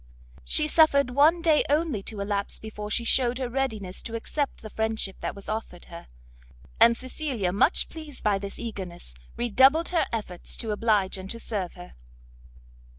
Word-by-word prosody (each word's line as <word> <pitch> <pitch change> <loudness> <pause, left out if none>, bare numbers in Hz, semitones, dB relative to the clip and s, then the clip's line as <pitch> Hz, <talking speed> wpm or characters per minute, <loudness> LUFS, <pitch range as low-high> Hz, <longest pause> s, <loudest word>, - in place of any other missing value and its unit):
She 305 - +2
suffered 280 -4 +4
one 310 +6 +4
day 315 -3 +5
only 295 -7 +1
to 210 -2 -5
elapse 200 0 -2
before 210 -1 -7
she 235 - 0
shewed 245 0 +2
her 260 -1 -2
readiness 220 -8 -3
to 230 - -6
accept 280 +4 -3
the 215 - -7
friendship 220 -3 -2
that - - -4
was 200 - -10
offered 215 -5 -5
her; 170 - -9 0.7
and 235 0 +6
Cecilia, 255 - -2
much 210 - +2
pleased 310 -4 -10
by 205 -2 +2
this 200 0 -7
eagerness, 185 - -7 0.2
redoubled 265 +8 +4
her 345 -2 +1
efforts 205 -6 -4
to 225 - -3
oblige 210 -3 +1
and 190 +1 -8
to 230 - -3
serve 200 -6 -3
her. 180 -1 -11
225 Hz, 165 wpm, -26 LUFS, 200-275 Hz, 0.7 s, and